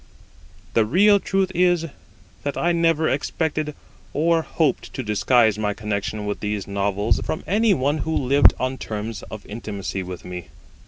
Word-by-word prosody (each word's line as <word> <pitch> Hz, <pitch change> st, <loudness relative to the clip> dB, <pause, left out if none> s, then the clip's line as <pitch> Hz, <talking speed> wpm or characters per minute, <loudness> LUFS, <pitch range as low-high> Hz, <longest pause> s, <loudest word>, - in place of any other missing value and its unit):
The 115 Hz, -, +4 dB
real 200 Hz, -, +5 dB
truth 190 Hz, 0 st, 0 dB
is, 175 Hz, -1 st, +3 dB, 0.6 s
that 145 Hz, -, -3 dB
I 175 Hz, -, +2 dB
never 165 Hz, -2 st, +2 dB
expected 150 Hz, +2 st, -1 dB, 0.4 s
or 165 Hz, +3 st, +2 dB
hoped 155 Hz, -4 st, -1 dB
to 130 Hz, -, -3 dB
disguise 110 Hz, 0 st, +3 dB
my 105 Hz, -1 st, -1 dB
connection 105 Hz, 0 st, -3 dB
with 105 Hz, -, -3 dB
these 105 Hz, -1 st, -3 dB
Novels 100 Hz, +2 st, 0 dB
from 155 Hz, -, -3 dB
any 210 Hz, +2 st, +3 dB
one 145 Hz, +3 st, 0 dB
who 160 Hz, +2 st, -2 dB
lived 140 Hz, +2 st, +5 dB
on 130 Hz, +1 st, -2 dB
terms 110 Hz, 0 st, -5 dB
of 110 Hz, -1 st, -8 dB
intimacy 100 Hz, -3 st, -5 dB
with 90 Hz, -1 st, -7 dB
me. 90 Hz, -1 st, -7 dB
130 Hz, 155 wpm, -23 LUFS, 105-160 Hz, 0.6 s, real